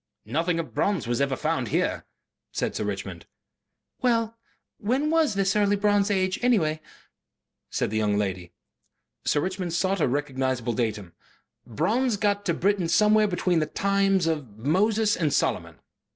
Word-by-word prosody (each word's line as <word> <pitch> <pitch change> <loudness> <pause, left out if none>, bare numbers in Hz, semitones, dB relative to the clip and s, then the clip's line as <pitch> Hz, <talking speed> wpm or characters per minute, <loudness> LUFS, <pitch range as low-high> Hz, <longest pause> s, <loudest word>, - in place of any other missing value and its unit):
"Nothing 165 +3 0
of 165 - -5
bronze 200 -3 0
has 120 +2 -1
ever 140 -1 +1
been - - -14
found 160 +1 0
here," - - -1 0.5
said - - -2
Sir - - -2
Richmond. - - -5 0.7
"Well, 230 -2 +1 0.4
when 260 +8 0
was 320 -9 +2
this 195 0 +1
early 205 -1 +3
bronze 205 0 +2
age, 185 -2 0
anyhow?" 180 -11 +2 0.9
said - - -1
the 110 - -1
young 105 -1 +1
lady. 95 -4 -3 0.7
Sir 145 - +2
Richmond 185 -1 -3
sought 190 +1 0
a - - +3
recognizable 130 -3 -1
datum. 105 -6 -3 0.5
"Bronze 210 - 0
got 205 0 0
to 170 - +1
Britain 195 -2 +1
somewhere 210 +6 +4
between 180 -2 +1
the 155 - 0
times 195 -2 +1
of 145 -10 -3
Moses 205 - +2
and 155 -4 0
Solomon." - - -1
185 Hz, 150 wpm, -25 LUFS, 140-205 Hz, 0.9 s, somewhere